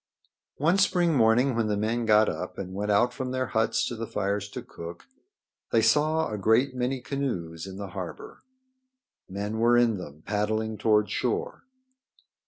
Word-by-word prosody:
One 170 +7 +2
spring 175 -3 +3
morning 120 +1 +3
when 115 -2 +1
the 105 -1 0
men 115 +2 -1
got 105 0 +5
up 90 0 -4
and 95 -1 -6
went 105 +2 -3
out 120 +4 +3
from 130 0 -4
their 130 0 -1
huts 110 0 +1
to 120 - -4
the 115 0 -5
fires 100 0 -2
to - - -7
cook 85 +1 -9 0.7
they 115 -1 +3
saw 155 +5 +2
a 105 - -3
great 115 +7 +3
many 125 +1 -1
canoes 95 - -4
in 95 0 -8
the 100 -1 -6
harbor. 90 -1 -8 0.9
Men 105 +3 -4
were 120 +1 +4
in 115 -4 +3
them 75 -3 -10
paddling 110 +1 -1
toward 105 -1 +2
shore. 455 +4 -2
110 Hz, 170 wpm, -27 LUFS, 100-125 Hz, 0.9 s, got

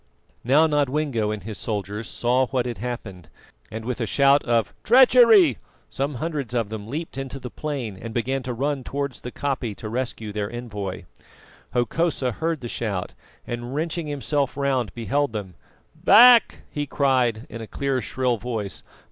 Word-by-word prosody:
Now 140 +6 +5
Nodwengo 145 -6 0
and 105 -1 -4
his 110 -1 -6
soldiers 105 0 -4
saw 125 +2 +1
what 125 -2 -1
had 120 -4 -4
happened, 100 -8 -6 0.4
and 110 +1 -6
with 125 0 -3
a 115 - -1
shout 140 +4 +4
of 115 -7 +1
"Treachery!" 230 - +6 0.3
some 140 +1 -2
hundreds 140 -3 -3
of 115 -4 0
them 110 -1 -6
leapt 150 +2 -5
into 135 0 -5
the 125 -1 -8
plain 130 -10 -4
and 115 - -6
began 130 +4 -1
to 125 -1 -4
run 140 +2 -1
towards 140 0 -4
the 125 - -6
koppie 130 -7 -2
to 110 - -7
rescue 115 -3 -3
their 105 0 -3
envoy. 105 -7 -5 0.7
Hokosa 130 +2 0
heard 160 +4 -2
the 120 - -5
shout, 105 -6 -3 0.3
and 120 +2 -5
wrenching 160 +1 -2
himself 145 -1 -1
round, 130 -7 0
beheld 135 +3 0
them. 100 -4 -5 0.4
"Back!" 240 0 +7
he 145 -1 -3
cried 130 -5 +1
in 115 - -8
a 110 - -7
clear, 135 +1 -1
shrill 120 +1 -1
voice. 110 -4 -4
125 Hz, 165 wpm, -24 LUFS, 110-145 Hz, 0.7 s, Back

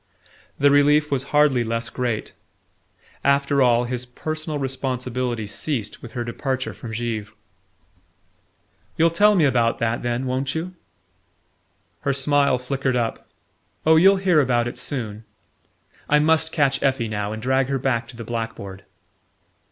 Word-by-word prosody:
The 145 0 +4
relief 150 +1 +4
was 135 -1 0
hardly 145 -4 +3
less 115 -1 -3
great. 120 -4 -3 0.9
After 140 0 +2
all, 120 -1 +4
his 125 0 -3
personal 155 +5 -5
responsibility 125 -3 -3
ceased 110 +1 -3
with 120 -2 -10
her 120 - -3
departure 130 0 -3
from 110 +4 -9
Givre. 110 -2 -3 1.7
"You'll 165 +1 +4
tell 210 +5 +4
me 170 -5 +4
about 120 -4 +2
that, 115 0 -1
then 120 +1 -2
won't 130 +2 -2
you?" 175 +3 -4 1.3
Her 140 - 0
smile 140 -1 +2
flickered 130 +1 -2
up. 115 -2 -2 0.6
"Oh, 160 +1 +6
you'll 190 +5 +6
hear 185 -5 +3
about 120 -3 +1
it 120 - -6
soon...I 115 +4 -5
must 160 +1 +2
catch 140 -4 +1
Effie 130 -4 +1
now 105 -1 -3
and 110 - -5
drag 130 +2 +1
her 135 0 0
back 120 -3 -1
to 120 - -12
the 115 - -6
blackboard." 115 -4 -5
130 Hz, 140 wpm, -22 LUFS, 115-145 Hz, 1.7 s, Oh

